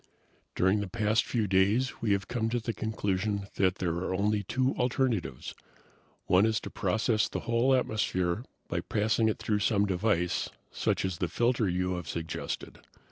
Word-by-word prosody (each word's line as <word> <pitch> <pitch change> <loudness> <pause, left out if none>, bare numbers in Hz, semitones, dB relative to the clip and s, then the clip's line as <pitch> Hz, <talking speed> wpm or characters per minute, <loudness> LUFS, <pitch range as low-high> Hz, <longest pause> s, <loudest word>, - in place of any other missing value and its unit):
"During 95 +3 +3
the 100 - -3
past 110 +2 +1
few 115 -3 0
days 100 +7 +2
we 110 - +1
have 100 -1 -1
come 115 -2 -1
to 120 +1 0
the 115 0 -3
conclusion 100 -2 -1
that 95 -1 +3
there 90 -4 -1
are 95 +1 -2
only 105 +2 +1
two 130 +7 0
alternatives: 125 - -1 0.7
One 95 +2 +4
is 110 -1 +2
to - - -7
process 110 +2 +1
the - - -4
whole 120 +3 +3
atmosphere 105 -5 0 0.2
by 85 - -2
passing 110 +1 +1
it 110 - -1
through 105 -1 0
some 100 0 +2
device, 90 -2 0 0.2
such - - 0
as 95 -3 -3
the 90 - 0
filter 115 +3 +1
you 90 +1 0
have 90 -3 -6
suggested. 80 -1 -5
105 Hz, 170 wpm, -29 LUFS, 95-115 Hz, 0.7 s, One